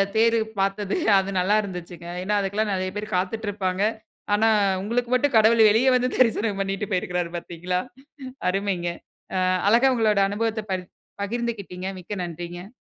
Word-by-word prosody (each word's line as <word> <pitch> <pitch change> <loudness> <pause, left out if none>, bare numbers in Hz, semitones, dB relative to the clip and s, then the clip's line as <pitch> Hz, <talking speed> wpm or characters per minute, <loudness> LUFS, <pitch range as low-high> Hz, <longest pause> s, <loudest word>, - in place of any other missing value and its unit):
தேரு 230 +1 +4 0.2
பாத்தது 195 +1 0 0.2
அது 195 0 -3
நல்லா 190 +4 +2
இருந்துச்சுங்க. 180 -3 -8 0.2
ஏனா, 210 +2 0
அதுக்குலாம் 205 +2 -1
நெறய 185 0 -1
பேரு 210 +1 -4
காத்திட்ருப்பாங்க. 195 -1 -2 0.5
ஆனா, 220 +2 +4 0.3
உங்களுக்கு 235 +4 -1
மட்டும், 255 +1 +2
கடவுள் 220 +1 +6
வெளிய 225 +5 +3
வந்து, 250 0 +2
தரிசனம் 225 -4 +2
பண்ணிட்டு 195 +1 -2
போயிருக்குறாரு, 180 -2 -1
பாத்தீங்களா 175 +1 -3 0.7
அருமைங்க. 190 -3 -1 0.5
அ, - - +1 0.3
அழகா 240 +5 +5
உங்களோட 215 -4 +2
அனுபவத்த 220 +2 -1
பரி 185 -1 -2 0.4
பகிர்ந்துகிட்டீங்க. 200 -4 -4
மிக்க 180 - -10
நன்றிங்க. 175 +5 -8
200 Hz, 135 wpm, -24 LUFS, 185-225 Hz, 0.7 s, கடவுள்